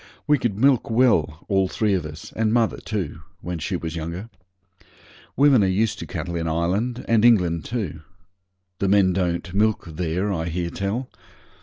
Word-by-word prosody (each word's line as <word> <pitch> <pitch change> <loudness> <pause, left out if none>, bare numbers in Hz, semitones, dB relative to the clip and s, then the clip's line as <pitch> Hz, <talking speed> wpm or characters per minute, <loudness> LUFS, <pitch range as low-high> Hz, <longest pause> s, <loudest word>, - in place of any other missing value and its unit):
We 150 -2 +3
could 120 -6 -1
milk 130 0 +3
well, 110 - +2
all 95 -2 +2
three 105 +2 0
of 90 -5 -1
us, 75 +1 -10
and 110 -1 +1
mother 115 -1 +2
too, 90 -8 -4 0.2
when 90 -1 -4
she - - -2
was 80 0 -4
younger. 85 +7 -5 1.0
Women 135 -6 +5
are - - +3
used 105 +3 0
to 85 - -6
cattle 85 +3 -4
in 80 -1 -2
Ireland, 95 +10 -1
and 115 -2 +3
England 90 -9 +4
too. 110 -11 -4 0.8
The 100 - +1
men 95 -2 +4
don't 90 -1 -1
milk 110 +2 +1
there, 90 +4 -2
I 80 -3 -2
hear 85 0 -3
tell. 105 +7 -3
95 Hz, 170 wpm, -23 LUFS, 85-110 Hz, 1.0 s, Women